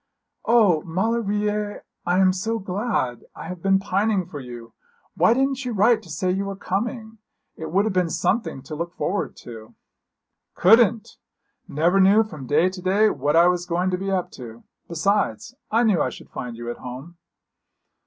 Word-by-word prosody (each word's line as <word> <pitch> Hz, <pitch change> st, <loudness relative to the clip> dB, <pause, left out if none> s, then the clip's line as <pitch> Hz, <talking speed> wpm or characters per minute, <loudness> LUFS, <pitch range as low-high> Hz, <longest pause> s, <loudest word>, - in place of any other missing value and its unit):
'O, 210 Hz, -9 st, +4 dB
Maulevrier, 210 Hz, +2 st, -1 dB, 0.2 s
I 175 Hz, +1 st, +2 dB
am 185 Hz, -1 st, +4 dB
so 225 Hz, +5 st, -2 dB
glad! 190 Hz, -, -2 dB
I -, -, -8 dB
have 180 Hz, -2 st, -7 dB
been 195 Hz, +1 st, +3 dB
pining 195 Hz, 0 st, 0 dB
for 160 Hz, -4 st, -8 dB
you. 120 Hz, -3 st, -10 dB, 0.4 s
Why 230 Hz, -, +3 dB
didn't 270 Hz, +1 st, 0 dB
you 250 Hz, -2 st, -3 dB
write 215 Hz, +3 st, +3 dB
to 175 Hz, -, -16 dB
say 180 Hz, +5 st, -1 dB
you 195 Hz, +2 st, -1 dB
were 195 Hz, 0 st, -4 dB
coming? 220 Hz, +3 st, -4 dB, 0.4 s
It 160 Hz, -1 st, -7 dB
would 195 Hz, +4 st, +2 dB
have 220 Hz, -, -1 dB
been 180 Hz, -2 st, +1 dB
something 190 Hz, -, -1 dB
to 145 Hz, -, -9 dB
look 170 Hz, +3 st, -5 dB
forward 200 Hz, +3 st, -2 dB
to.' 110 Hz, -2 st, -12 dB, 0.8 s
'Couldn't. 225 Hz, +2 st, +4 dB, 0.5 s
Never 170 Hz, +6 st, +2 dB
knew 200 Hz, +3 st, +6 dB
from 155 Hz, -, -9 dB
day 155 Hz, +6 st, +3 dB
to 185 Hz, 0 st, -5 dB
day 200 Hz, +4 st, +3 dB
what 145 Hz, +2 st, -1 dB
I 170 Hz, +1 st, +6 dB
was 180 Hz, 0 st, 0 dB
going 180 Hz, +2 st, 0 dB
to 180 Hz, -, 0 dB
be 195 Hz, +1 st, -3 dB
up 185 Hz, -2 st, -1 dB
to; 120 Hz, -3 st, -11 dB, 0.2 s
besides, 170 Hz, -, -1 dB, 0.2 s
I 230 Hz, +2 st, +2 dB
knew 205 Hz, -9 st, +3 dB
I 130 Hz, -, +1 dB
should -, -, -13 dB
find 120 Hz, -2 st, -6 dB
you 120 Hz, 0 st, -5 dB
at -, -, -8 dB
home.' 135 Hz, +8 st, -9 dB
185 Hz, 180 wpm, -23 LUFS, 160-210 Hz, 0.8 s, knew